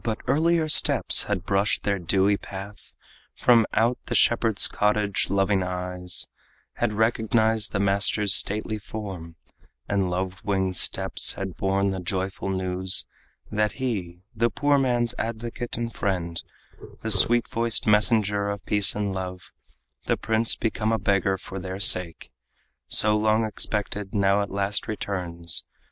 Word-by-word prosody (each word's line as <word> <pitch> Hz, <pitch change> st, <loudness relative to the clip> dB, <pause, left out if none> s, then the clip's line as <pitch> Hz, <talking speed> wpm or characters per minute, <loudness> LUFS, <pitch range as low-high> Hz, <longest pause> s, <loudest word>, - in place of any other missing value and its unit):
But 110 Hz, -2 st, -2 dB
earlier 165 Hz, +2 st, +1 dB
steps 155 Hz, -, +5 dB
had 100 Hz, -3 st, -3 dB
brushed 100 Hz, +1 st, 0 dB
their 100 Hz, -1 st, -1 dB
dewy 95 Hz, +3 st, +1 dB
path. 100 Hz, +1 st, -11 dB, 0.4 s
From 115 Hz, -3 st, +3 dB
out 120 Hz, +2 st, 0 dB
the -, -, -3 dB
shepherd's 115 Hz, -3 st, +7 dB
cottage 105 Hz, -1 st, 0 dB
loving 100 Hz, 0 st, +1 dB
eyes 90 Hz, 0 st, -3 dB, 0.5 s
Had 105 Hz, -, -2 dB
recognized 110 Hz, 0 st, +1 dB
the 100 Hz, -, -2 dB
master's 100 Hz, 0 st, +2 dB
stately 110 Hz, +2 st, 0 dB
form, 95 Hz, -6 st, -8 dB, 0.5 s
And 100 Hz, -2 st, -1 dB
love 95 Hz, +1 st, -4 dB
winged 95 Hz, -2 st, -1 dB
steps -, -, +2 dB
had 95 Hz, -2 st, -6 dB
borne 95 Hz, +1 st, -1 dB
the 95 Hz, -, -4 dB
joyful 95 Hz, +2 st, -4 dB
news 95 Hz, 0 st, -1 dB, 0.5 s
That 105 Hz, 0 st, 0 dB
he, 95 Hz, -9 st, -5 dB
the 115 Hz, +1 st, +1 dB
poor 145 Hz, +6 st, +1 dB
man's 120 Hz, -3 st, 0 dB
advocate 115 Hz, +1 st, -5 dB
and 115 Hz, -1 st, -4 dB
friend, 85 Hz, -4 st, -3 dB, 0.6 s
The -, -, -2 dB
sweet 120 Hz, 0 st, +4 dB
voiced 115 Hz, 0 st, 0 dB
messenger 105 Hz, -1 st, +2 dB
of 100 Hz, -1 st, -6 dB
peace 105 Hz, -2 st, +2 dB
and 100 Hz, -2 st, -3 dB
love, 90 Hz, -1 st, -7 dB, 0.6 s
The -, -, +1 dB
prince 110 Hz, +1 st, 0 dB
become 110 Hz, -1 st, -2 dB
a 115 Hz, -, +1 dB
beggar 100 Hz, -2 st, 0 dB
for 95 Hz, +1 st, -9 dB
their 95 Hz, +1 st, -7 dB
sake, 90 Hz, -4 st, +4 dB, 0.6 s
So 105 Hz, 0 st, +2 dB
long 110 Hz, +1 st, +1 dB
expected, 105 Hz, -1 st, -4 dB
now 100 Hz, 0 st, +2 dB
at 100 Hz, -, -4 dB
last 100 Hz, +1 st, -2 dB
returns. 90 Hz, -6 st, -3 dB
100 Hz, 140 wpm, -24 LUFS, 95-110 Hz, 0.6 s, shepherd's